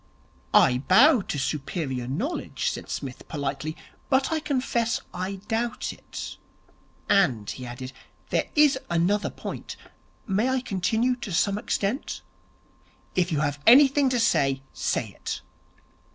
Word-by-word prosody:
'I 125 -1 +6
bow 255 - +7
to 150 - -4
superior 135 -3 -2
knowledge,' 210 - -2
said - - -7
Psmith 135 -3 -6
politely, 145 +1 -3 0.3
'but 265 +2 +2
I 320 - +1
confess 255 -5 0
I 185 +2 -3
doubt 230 +1 -2
it. - - -8 0.7
And,' 125 - +3
he 125 -1 -6
added, 130 +2 -7 0.4
'there - - +1
is 295 -3 +5
another 175 +5 +1
point. - - -7 0.5
May 210 +4 +1
I 260 -1 +1
continue 225 +3 0
to 225 -5 -6
some 200 +4 +1
extent?' 210 +6 -2 0.9
'If 180 -1 +1
you 150 -2 +1
have 145 -1 -1
anything 275 +2 +7
to 250 -1 +1
say, 135 -11 +2
say - - -1
it.' - - -6
195 Hz, 130 wpm, -26 LUFS, -, 0.9 s, bow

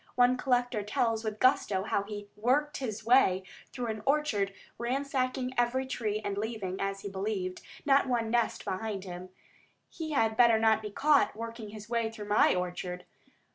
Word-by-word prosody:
One 245 0 +5
collector 245 -3 +1
tells 225 +2 0
with 215 -1 -3
gusto 210 -7 +3
how 200 - 0
he 205 0 -7
"worked 265 +8 +1
his 220 -5 -4
way" 225 -7 +4 0.3
through 250 -2 -4
an 220 -2 -3
orchard, 270 -9 +1 0.3
ransacking 255 0 -1
every 250 +2 +1
tree, 215 -5 -2
and 200 0 -2
leaving, 205 -4 -3
as 195 0 -2
he 205 - -6
believed, 190 -2 -3 0.2
not 275 -1 +4
one 235 -3 0
nest 235 -1 0
behind 195 0 -3
him. 180 -1 -8 0.6
He 315 -2 -5
had 225 -5 +2
better 235 -1 +6
not 220 0 +3
be 210 - -5
caught 285 +5 +3
working 230 -1 -6
his 215 0 -10
way 230 -1 0
through 210 -2 -9
my 210 - +4
orchard. 180 0 -4
220 Hz, 170 wpm, -30 LUFS, 205-250 Hz, 0.6 s, better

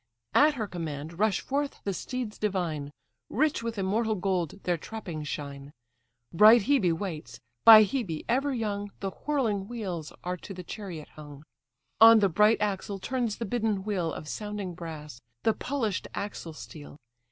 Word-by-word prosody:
At 295 +1 +5
her 225 -4 -2
command 165 -2 -6
rush 215 -3 +2
forth 280 +1 -2
the 200 - -1
steeds 245 +2 -5
divine; 170 -8 -2 0.4
Rich 300 +2 +1
with 230 -1 -4
immortal 215 +3 0
gold 185 -3 -1
their 175 - +1
trappings 170 -4 -6
shine. 140 -1 -6 0.6
Bright 215 +5 +8
Hebe 220 -8 +3
waits; 160 - -5 0.3
by 220 -1 +11
Hebe, 200 - -3
ever 275 +4 +1
young, 205 -4 -3
The 195 -1 -3
whirling 225 -10 -1
wheels 190 -10 -5
are 180 +1 -3
to 195 +3 -9
the 180 - -7
chariot 175 -4 -7
hung. 145 -1 -12 0.5
On 225 0 +10
the 200 -2 +3
bright 210 +6 +4
axle 200 -1 -2
turns 235 +1 -2
the 230 - -4
bidden 215 -3 -1
wheel 185 -6 -1
Of 155 - -7
sounding 205 -1 -4
brass; 155 -6 -8 0.2
the 225 - +3
polished 235 -8 -2
axle 185 -5 -5
steel. 145 +4 -11
200 Hz, 155 wpm, -28 LUFS, 165-225 Hz, 0.6 s, by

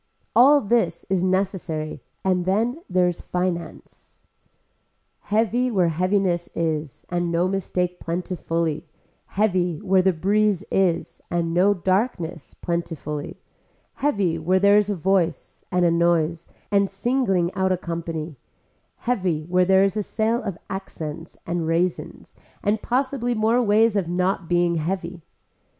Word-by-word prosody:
All 280 +4 +7
this 200 -6 0
is 190 -2 +2
necessary 185 -5 -1 0.2
and 180 -2 +1
then 230 - 0
there 180 -1 +3
is 175 - -3
finance. 180 -2 -5 1.0
Heavy 230 +4 +1
where 185 -7 +2
heaviness 180 +1 0
is 155 -4 -2
and 175 -1 0
no 170 +2 +2
mistake 180 -2 -2
plentifully, 165 -2 -2 0.4
heavy 180 -5 0
where 190 -2 +3
the 190 +1 +3
breeze 200 +3 +1
is 185 -3 0
and 170 -1 -1
no 195 +4 +4
darkness 185 - -1
plentifully, 160 -4 -4 0.6
heavy 200 - +1
where 185 +4 +2
there 200 +1 +5
is 210 -1 -1
a 205 - 0
voice 180 -1 -1
and 180 -1 +2
a 170 - +4
noise 170 -1 +1 0.2
and 200 -1 +3
singling 195 -5 0
out 190 0 +1
a 185 - +2
company, 165 -3 -5 0.7
heavy 185 -10 0
where 180 +3 +2
there 190 +1 +5
is 195 +1 +1
a 215 - 0
sale 220 +3 0
of 195 -6 -4
accents 165 -4 -7
and 170 -1 -2
raisins 170 +2 -2 0.3
and 210 +1 +1
possibly 250 -1 0
more 225 +3 +2
ways 220 0 +3
of 195 -4 0
not 180 0 -1
being 175 -1 +2
heavy. 170 +1 -3
185 Hz, 135 wpm, -23 LUFS, 170-200 Hz, 1.0 s, All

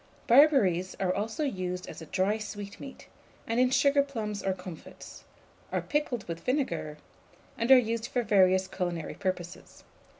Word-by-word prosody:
Barberries 230 - +4
are 185 -1 +1
also 220 - -3
used 185 -8 -3
as - - -9
a 160 - -9
dry 195 +6 0
sweetmeat, 205 +4 -8 0.4
and 230 +1 -1
in 255 0 +4
sugarplums 265 -7 +1
or 195 - +1
comfits; 180 -3 -11 0.5
are - - 0
pickled 295 -7 -2
with 165 -1 -5
vinegar, 170 - -2 0.6
and 230 - -2
are 265 - +10
used 230 -1 0
for 245 -1 -1
various 190 -3 +4
culinary 175 -4 -4
purposes. 180 -3 -5
205 Hz, 140 wpm, -29 LUFS, 185-250 Hz, 0.6 s, are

